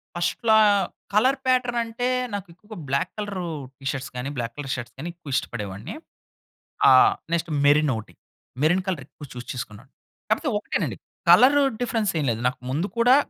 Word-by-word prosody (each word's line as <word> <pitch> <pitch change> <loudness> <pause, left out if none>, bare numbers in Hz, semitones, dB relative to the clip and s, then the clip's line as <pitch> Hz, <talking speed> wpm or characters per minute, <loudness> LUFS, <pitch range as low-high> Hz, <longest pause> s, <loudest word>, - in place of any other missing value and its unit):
ఫస్ట్‌లో, 220 +6 +2 0.6
colour 260 +6 +4
pattern 250 -2 +2
అంటే 235 +2 -3 0.3
నాకు 200 -2 -4
ఎక్కువగా 210 +4 -12
బ్లాక్ 140 +1 0
కలరు 200 -4 -4 0.3
టి 135 - -15
షర్ట్స్ 135 -1 -6
గాని, 125 +3 -3
బ్లాక్ 115 0 -3
కలర్ 135 -2 -3
షర్ట్స్ 120 -2 -8
గాని 165 +5 -5
ఎక్కువ 155 -6 -8
ఇష్టపడేవాడిని. 105 - -4 0.9
ఆహ్, 400 0 +7 0.2
నెక్స్ట్ 170 0 0 0.2
మెరినోటి. 145 -6 +2 0.5
మెరిన్ 175 +5 +3
కలర్ 180 -7 -1
ఎక్కువ 145 - -12
చూస్ 125 0 -8
చేసుకున్నాను. 105 -5 -8 0.4
కాపోతే - - +1
ఒకటేనండి - - -2 0.3
కలరు 260 +10 +7 0.2
డిఫరెన్స్ 225 -5 0
ఏమి 145 - -1
లేదు 115 - -3
నాకు. 125 - -3
ముందు 160 +9 -1
కూడా, 245 +2 +6
175 Hz, 155 wpm, -24 LUFS, 135-225 Hz, 0.9 s, ఆహ్